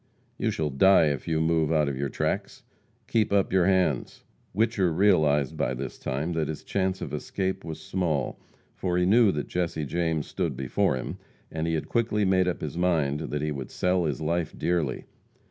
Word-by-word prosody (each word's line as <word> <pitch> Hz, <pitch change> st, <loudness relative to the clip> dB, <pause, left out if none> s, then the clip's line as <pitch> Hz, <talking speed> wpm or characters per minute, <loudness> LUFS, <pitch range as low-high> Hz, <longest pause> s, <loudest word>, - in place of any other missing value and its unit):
"You -, -, +1 dB
shall 75 Hz, -2 st, -1 dB
die 80 Hz, +3 st, +5 dB
if 70 Hz, -3 st, -4 dB
you 80 Hz, -1 st, +1 dB
move 80 Hz, -1 st, +2 dB
out 75 Hz, -2 st, +3 dB
of 70 Hz, -, -2 dB
your 70 Hz, +1 st, -2 dB
tracks! -, -, -3 dB, 0.4 s
Keep 110 Hz, -3 st, +1 dB
up 100 Hz, -2 st, +2 dB
your 95 Hz, -1 st, +4 dB
hands!" 90 Hz, -9 st, +1 dB, 0.3 s
Whicher 105 Hz, -3 st, +1 dB
realized 80 Hz, -7 st, +3 dB
by 65 Hz, -, -1 dB
this 65 Hz, +2 st, -6 dB
time 75 Hz, +6 st, -2 dB
that 80 Hz, -2 st, -1 dB
his 80 Hz, -1 st, -5 dB
chance 95 Hz, -1 st, -1 dB
of 70 Hz, -, -6 dB
escape 95 Hz, +5 st, -3 dB
was 80 Hz, -1 st, -6 dB
small, 80 Hz, -3 st, -2 dB, 0.3 s
for 90 Hz, -2 st, -1 dB
he 90 Hz, -, +3 dB
knew 110 Hz, +2 st, +5 dB
that 75 Hz, -4 st, -3 dB
Jesse 85 Hz, -4 st, -2 dB
James 80 Hz, 0 st, -1 dB
stood 85 Hz, -9 st, -3 dB
before 65 Hz, 0 st, +1 dB
him, 65 Hz, -, -5 dB, 0.3 s
and 80 Hz, 0 st, -2 dB
he 80 Hz, -, +1 dB
had 80 Hz, -, -3 dB
quickly 110 Hz, -3 st, +1 dB
made 95 Hz, -1 st, +3 dB
up 90 Hz, -, -2 dB
his 85 Hz, -, -4 dB
mind 80 Hz, -5 st, +1 dB
that 75 Hz, -2 st, -3 dB
he 75 Hz, -, -1 dB
would 70 Hz, -3 st, -5 dB
sell 90 Hz, -1 st, +1 dB
his 75 Hz, -5 st, -2 dB
life 85 Hz, +1 st, -1 dB
dearly. 85 Hz, -2 st, -1 dB
80 Hz, 195 wpm, -27 LUFS, 75-95 Hz, 0.4 s, die